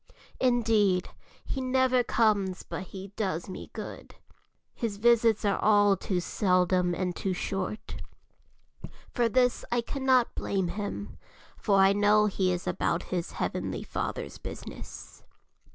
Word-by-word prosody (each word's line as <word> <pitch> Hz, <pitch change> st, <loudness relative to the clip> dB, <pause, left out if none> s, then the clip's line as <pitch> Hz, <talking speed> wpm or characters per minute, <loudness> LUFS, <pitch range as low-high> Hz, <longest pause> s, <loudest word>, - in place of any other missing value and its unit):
Indeed, 220 Hz, -7 st, +2 dB, 0.4 s
he 270 Hz, -, -3 dB
never 255 Hz, -1 st, +3 dB
comes 205 Hz, -6 st, +1 dB
but 185 Hz, -, -6 dB
he 195 Hz, +1 st, -8 dB
does 190 Hz, -5 st, -3 dB
me 185 Hz, -, -8 dB
good; -, -, -8 dB, 0.6 s
his 220 Hz, -4 st, -3 dB
visits 230 Hz, -1 st, +4 dB
are 200 Hz, -, +1 dB
all 205 Hz, -1 st, +5 dB
too 185 Hz, 0 st, -2 dB
seldom 180 Hz, -1 st, +1 dB
and 180 Hz, -1 st, -2 dB
too 190 Hz, -, -2 dB
short. 195 Hz, +3 st, -4 dB, 1.2 s
For 240 Hz, -2 st, +2 dB
this 250 Hz, +1 st, +2 dB
I 240 Hz, 0 st, +2 dB
cannot 260 Hz, -1 st, +2 dB
blame 190 Hz, -3 st, -1 dB
him, 195 Hz, -, -5 dB, 0.4 s
for 200 Hz, -, +1 dB
I 195 Hz, 0 st, +6 dB
know 210 Hz, +1 st, +4 dB
he 190 Hz, -2 st, +1 dB
is 180 Hz, 0 st, -3 dB
about 170 Hz, -, 0 dB
his 175 Hz, -2 st, -2 dB
Heavenly -, -, -3 dB
Father's -, -, -4 dB
business. -, -, -9 dB
205 Hz, 130 wpm, -28 LUFS, 185-230 Hz, 1.2 s, I